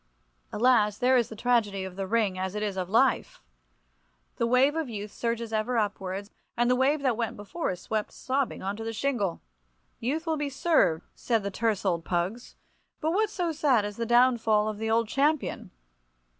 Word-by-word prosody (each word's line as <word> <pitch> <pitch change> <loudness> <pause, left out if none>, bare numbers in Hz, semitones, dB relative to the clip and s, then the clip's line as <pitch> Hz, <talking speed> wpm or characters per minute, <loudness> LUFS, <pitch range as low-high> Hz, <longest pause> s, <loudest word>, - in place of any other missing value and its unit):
Alas, 210 -3 +3
there 260 +1 +3
is 240 -3 +2
the 220 - -8
tragedy 215 -4 +1
of 190 -1 -7
the 195 0 -4
ring 215 -3 +1
as 190 +1 -3
it 210 - -2
is 205 -2 -2
of 185 -1 -3
life! 245 +5 +1 0.9
The 235 - +1
wave 260 +5 +4
of 320 -5 -2
youth 210 -2 -6
surges 230 -1 -3
ever 220 +3 0
upwards, 200 -1 -2 0.3
and 240 +1 +3
the - - +4
wave 280 +3 +2
that 255 -4 +2
went 230 -1 -3
before 205 +12 -4
is 180 -1 -4
swept 215 -1 -2
sobbing 270 -4 -2
on 195 +1 -2
to 225 - -6
the 225 0 -4
shingle. 220 -6 -1 0.6
"Youth 295 +8 -2
will 320 -1 0
be 295 -1 -2
served," 265 - +2
said 230 -4 -1
the 200 - -3
terse 215 -1 -1
old 170 -3 0
pugs. 185 +8 -3 0.4
But 315 - 0
what 425 +4 +2
so 355 -5 -2
sad 275 -8 +2
as 205 0 -6
the 230 -1 -2
downfall 235 -3 +4
of 215 -1 -4
the 220 0 -2
old 225 0 +2
champion! 290 +5 0
230 Hz, 195 wpm, -27 LUFS, 205-260 Hz, 0.9 s, wave